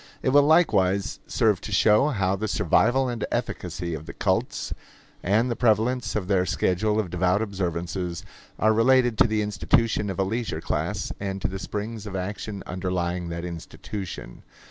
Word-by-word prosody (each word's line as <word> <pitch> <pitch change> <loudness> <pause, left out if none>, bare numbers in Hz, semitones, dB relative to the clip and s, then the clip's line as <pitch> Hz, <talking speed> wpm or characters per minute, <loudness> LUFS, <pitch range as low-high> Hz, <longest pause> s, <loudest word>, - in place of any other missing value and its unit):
It - - +2
will 145 +2 +6
likewise 105 - +3
serve 110 -6 +2
to 105 - -7
show 105 +7 +4
how 100 -9 +1
the 110 +3 -3
survival 125 +6 +2
and 120 -3 -3
efficacy 85 -2 -3
of 80 0 -6
the - - -7
cults - - -1 0.5
and 105 +6 +2
he - - +1
prevalence 120 +2 +1
of 100 -4 -2
their 95 -2 +3
schedule 105 +4 +1
of 95 -6 -2
devout 90 +4 +2
observances 90 -2 -3 0.3
are 110 +1 +3
related 120 +1 +4
to - - +6
the 105 -1 0
institution 105 +3 +1
of 95 - -4
a 95 - +2
leisure 110 -4 -2
class - - -2
and 95 -1 -3
to - - +2
the 95 +1 -5
springs 105 +2 -5
of 100 - -6
action 100 +2 -4
underlying 90 -1 -2
that 85 +1 -4
institution. 90 - -7
100 Hz, 165 wpm, -25 LUFS, 90-110 Hz, 0.5 s, will